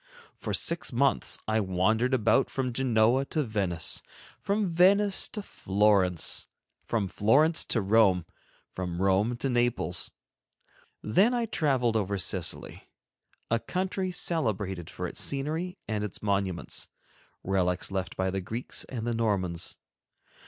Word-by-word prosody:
For - - -5
six 170 -2 0
months 135 +3 +1
I 110 0 +2
wandered 110 +6 +1
about 130 +3 +3
from 125 -2 -2
Genoa 120 0 +3
to 155 +2 -1
Venice, 100 -8 -1 0.4
from 205 +1 0
Venice 190 +4 +3
to 210 - -6
Florence, 95 - +2 0.4
from 110 -4 0
Florence 140 - +3
to 115 - 0
Rome, 100 -4 +3 0.5
from 90 -2 -4
Rome 100 +5 +2
to 135 - -1
Naples. 120 -7 +1 0.9
Then 195 - +3
I 240 -1 0
traveled 135 - +1
over 100 -2 0
Sicily, 95 - -2 0.6
a 115 - +3
country 185 +4 -2
celebrated 105 - -2
for - - -5
its - - -2
scenery 160 +7 -2
and 105 -2 -2
its 105 -1 -6
monuments, 100 -3 -1 0.6
relics 90 -1 0
left 95 -1 -3
by 95 0 0
the 95 0 -2
Greeks 115 +7 -4
and 115 -3 -5
the 120 - 0
Normans. 95 -7 -1
110 Hz, 130 wpm, -28 LUFS, 95-140 Hz, 0.9 s, about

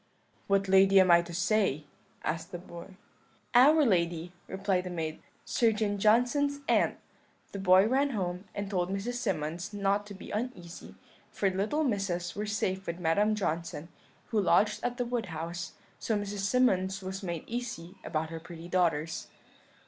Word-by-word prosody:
"'What 195 0 +2
lady 195 0 +6
am 185 -2 +5
I 170 0 +7
to 170 - -9
say?' 185 -4 +1 0.4
asked 165 +1 -3
the 175 - -4
boy. 175 +1 -11 0.6
"'Our 290 +5 +7
lady,' 170 -4 +1 0.2
replied 190 -1 -1
the - - -4
maid; 160 -3 -4 0.2
'Surgeon 215 -3 +1
Johnson's 250 +7 +3
aunt.' - - +2 0.5
"The 200 - -5
boy 190 0 +6
ran 275 +4 +2
home, 185 -5 -3
and 200 0 -3
told 180 -3 -1
Mrs. 200 +5 -3
Symonds 175 -3 -3
not 200 +1 0
to 205 - -9
be 190 - -10
uneasy, 205 -6 -6 0.3
for 195 -2 0
the 185 - -5
little 220 +11 0
Misses 195 - -1
were 210 +1 -3
safe 190 -2 -2
with 170 0 -3
Madam 200 +6 +2
Johnson, 165 -4 -3 0.4
who 220 -2 +2
lodged 210 +2 +3
at 245 0 -2
the 245 - -1
Wood 235 -3 -2
House; 170 +2 -5 0.3
so 220 - 0
Mrs. 205 0 -4
Symonds 195 -3 +1
was 190 +1 -5
made 170 -4 -4
easy 220 -8 -5
about 160 0 -2
her 165 - -5
pretty 170 0 -10
daughters. 165 -3 0
195 Hz, 165 wpm, -30 LUFS, 175-210 Hz, 0.6 s, I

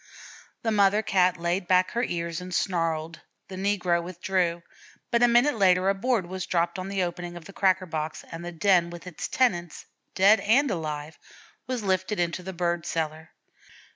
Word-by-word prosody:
The 225 - +1
mother 205 0 +3
Cat 185 -2 +2
laid 175 +2 -1
back 185 0 +3
her 235 - -1
ears 170 -6 -3
and 180 0 -8
snarled. 165 -2 -1 0.3
The 190 - -7
negro 185 -3 +1
withdrew, 175 -1 -1 0.5
but 235 - +2
a 245 - +7
minute 240 +5 +4
later 185 -1 +4
a - - +3
board 215 0 0
was 185 +1 -5
dropped 175 +1 0
on 185 - -5
the 195 -1 -1
opening 175 0 -5
of 165 - -11
the 200 - -11
cracker 185 -1 +2
box, 155 -2 -4
and 165 +1 -7
the 175 - -5
den 175 0 +3
with 175 0 -10
its 180 -4 -5
tenants, 175 -10 0 0.3
dead 200 +4 +6
and 255 +5 +3
alive, 155 -3 -4 0.5
was 250 -3 -3
lifted 190 +1 0
into 175 +1 -1
the 190 +1 -6
bird 175 -1 -1
cellar. 160 -1 -3
180 Hz, 180 wpm, -26 LUFS, 170-195 Hz, 0.5 s, a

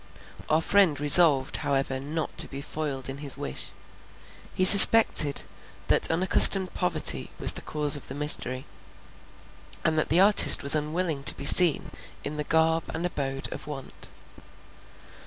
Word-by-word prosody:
Our 155 +1 -3
friend 190 -7 -2
resolved 145 -2 +3
however 135 -1 -6
not 150 +3 -10
to - - +1
be 135 - -13
foiled 140 -5 -9
in 135 +1 -11
his 140 -3 0
wish. 65 - -9 0.9
He 185 - -3
suspected, 195 -7 +6 0.5
that - - 0
unaccustomed 185 +2 +3
poverty 155 - -3
was - - +3
the - - -10
cause 150 -1 -1
of 145 - -13
the 135 - -12
mystery, 140 -3 0 1.2
and 160 0 -3
that - - -7
the 170 - -2
artist 200 +2 +3
was 140 - +4
unwilling 155 -1 -5
to - - -2
be 140 - -10
seen 175 0 +3 0.3
in 150 +1 -10
the 150 - -7
garb 160 +1 -4
and 165 +2 -9
abode 135 -6 -9
of - - -14
want. 140 -3 -12
150 Hz, 150 wpm, -21 LUFS, 140-165 Hz, 1.2 s, suspected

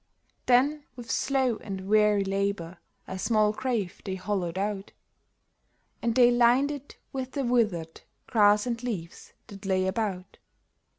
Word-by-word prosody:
Then 285 +4 +3
with 240 -2 -7
slow 265 -4 +1
and 195 -3 -6
weary 210 -1 +4
labor 195 -3 -2 0.3
a 190 - -5
small 215 0 +2
grave 215 -5 -3
they 190 -2 -3
hollowed 185 -2 -2
out, 200 0 -3 1.1
And 230 -1 0
they 245 -1 +6
lined 245 +4 +4
it 285 -1 -8 0.2
with 260 -1 -4
the 280 - -1
withered 210 -10 0 0.2
grass 210 -1 +4
and 235 -2 -3
leaves 190 -9 -6
that 200 0 -12
lay 190 -1 +1
about. 190 -2 -3
210 Hz, 135 wpm, -27 LUFS, 195-245 Hz, 1.1 s, they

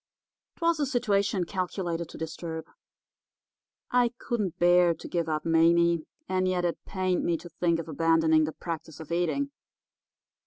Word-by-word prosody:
"'Twas 335 -2 +1
a 290 - +2
situation 205 -7 +1
calculated 175 -2 -3
to - - -10
disturb. 160 0 -5 1.3
I 245 -1 +3
couldn't 210 -10 -2
bear 175 -1 +5
to - - -9
give 170 -2 -1
up 155 -1 -2
Mame; 165 0 +3 0.2
and 185 0 +1
yet 180 -1 0
it 170 - -2
pained 185 -2 -1
me 170 -1 +1
to 175 - -11
think 170 +1 +1
of 165 - -5
abandoning 160 0 +3
the 155 - -3
practice 160 -2 -6
of 160 0 -9
eating. 175 - 0
170 Hz, 150 wpm, -28 LUFS, 165-185 Hz, 1.3 s, bear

